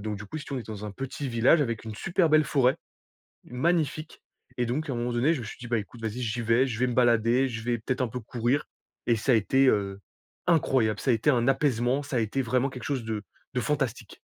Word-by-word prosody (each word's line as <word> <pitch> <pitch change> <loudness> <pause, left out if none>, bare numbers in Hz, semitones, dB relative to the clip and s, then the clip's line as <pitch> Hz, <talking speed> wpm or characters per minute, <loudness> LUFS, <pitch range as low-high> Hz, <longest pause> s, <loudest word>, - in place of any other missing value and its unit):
donc 105 0 -3
du 105 - -8
coup, 155 - -6
si 150 - -8
tu - - -9
veux - - -1
on - - -5
était 110 - -10
dans 105 0 -7
un 105 - -6
petit 135 +4 -5
village 120 +7 +4
avec 115 -6 -2
une 110 -1 -6
super 175 - +1
belle 155 0 +5
forêt, 130 -4 +2 0.7
magnifique 155 +3 -1 0.4
et 120 - +1
donc 145 +5 -2
à - - -2
un 120 - -2
moment 120 +1 -2
donné 125 +8 +2
je 145 - -4
me 115 - -6
suis - - -8
dit: 125 - -8
«Bah, 120 -1 +1
écoute 115 +2 -8
vas-y 110 +3 -3
j'y 120 +1 -2
vais 115 +4 +3
je 115 -4 -4
vais 125 - +2
me 125 - -2
balader 120 +1 +3
je 110 -3 -5
vais 120 0 0
peut-être 130 +4 -2
un 125 - 0
peu 125 +3 -5
courir» 120 +5 -1 0.4
et 120 -1 +3
ça 125 +4 +1
a - - +6
été, 130 +6 +3
heu, 100 -3 0 0.5
incroyable. 130 - +2
Ça 130 - +1
a - - +5
été 115 +7 +2
un 120 -2 +2
apaisement 135 -1 +1
ça 140 -2 -4
a - - +3
été 115 +5 -1
vraiment 125 +2 +1
quelque 130 -1 -9
chose 135 -5 -2
de 110 -2 -3 0.3
de - - +1
fantastique. - - -2
125 Hz, 265 wpm, -27 LUFS, 115-135 Hz, 0.7 s, a